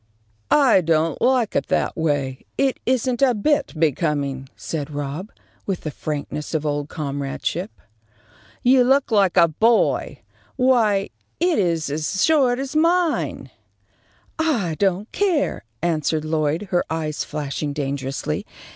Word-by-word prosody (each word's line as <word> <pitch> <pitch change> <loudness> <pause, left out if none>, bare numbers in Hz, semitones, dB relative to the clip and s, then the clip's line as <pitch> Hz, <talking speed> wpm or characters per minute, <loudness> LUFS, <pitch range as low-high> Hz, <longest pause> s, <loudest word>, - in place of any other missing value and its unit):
"I 270 -10 +5
don't 160 -1 +1
like 250 -3 +2
it - - 0
that - - 0
way. 145 -5 -1
It 270 -1 +1
isn't 255 0 +1
a 255 -3 +4
bit 290 +8 +1
becoming," 145 -4 0
said 150 -3 -4
Rob, 145 +7 -5 0.4
with 195 -3 -2
the 155 - -4
frankness 150 +1 -4
of 155 -1 -1
old 145 0 -2
comradeship. 145 +5 -3 0.9
"You 250 +1 +5
look 265 0 +2
like 195 -4 +3
a 170 -1 +7
boy. 225 +9 +1 0.3
Why, 230 -7 +2 0.3
it 345 -1 +2
is 165 -6 0
as 155 +6 -1
short 270 -6 +3
as 270 +2 -5
mine." 335 +1 +1 0.9
"I 240 - +1
don't 195 +2 0
care," 360 - 0 0.2
answered 155 -2 0
Lloyd, 155 +4 -1
her 175 -1 +2
eyes 155 -2 -2
flashing 145 0 -4
dangerously. 135 - -3
170 Hz, 130 wpm, -22 LUFS, 150-250 Hz, 0.9 s, a